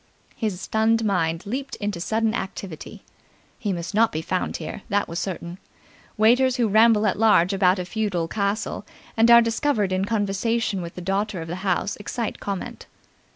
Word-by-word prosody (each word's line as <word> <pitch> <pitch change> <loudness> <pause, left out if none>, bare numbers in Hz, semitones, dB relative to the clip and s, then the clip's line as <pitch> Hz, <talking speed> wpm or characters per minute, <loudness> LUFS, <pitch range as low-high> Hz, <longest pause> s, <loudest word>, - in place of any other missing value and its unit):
His 210 -6 -2
stunned 220 +3 +1
mind 165 -4 0
leaped 270 +6 -4
into 205 -4 -4
sudden 220 +3 0
activity. 190 -6 -6 0.6
He 210 -4 -2
must 170 -2 -4
not 225 +2 +3
be 155 +1 -3
found 185 +2 -2
here, 160 +5 -7
that 205 -1 +1
was 170 +1 -4
certain. 175 -1 -5 0.6
Waiters 245 +4 +4
who 240 -3 +2
ramble 220 +1 +5
at 200 - 0
large 210 -4 +4
about 190 -1 +3
a 180 - -3
feudal 185 -4 -2
castle 200 +3 -2 0.3
and 225 +1 +4
are 235 0 +8
discovered 230 -3 0
in 185 +1 0
conversation 205 0 -1
with 170 0 -7
the 180 - -6
daughter 195 +2 -1
of 165 - -6
the 175 +2 -4
house 190 +1 -1
excite 220 +2 -4
comment. 200 -2 -5
205 Hz, 170 wpm, -24 LUFS, 185-225 Hz, 0.6 s, are